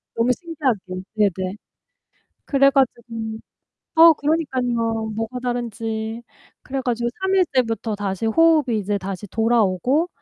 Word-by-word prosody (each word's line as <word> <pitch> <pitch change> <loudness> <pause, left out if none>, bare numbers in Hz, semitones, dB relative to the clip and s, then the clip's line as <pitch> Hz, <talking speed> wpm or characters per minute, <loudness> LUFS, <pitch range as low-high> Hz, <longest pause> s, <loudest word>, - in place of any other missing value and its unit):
너무 230 +2 +2
신기하게. 295 - -2 0.4
네네. 190 -2 0 0.9
그래 275 -1 +4
가지고 265 -4 +1 0.9
어 330 0 +9
그러니깐요. 245 -8 -1
뭐가 225 +3 -3
다른지. 230 -2 -3 0.4
그래 270 +1 -3
가지고 240 -1 -1
3 380 0 +1
일째부터 240 - +1
다시 200 +1 -3
호흡이 295 -1 +3
이제 205 0 -1
다시 195 +1 -6
돌아오고 230 - +1
235 Hz, 270 characters per minute, -22 LUFS, 220-275 Hz, 0.9 s, 어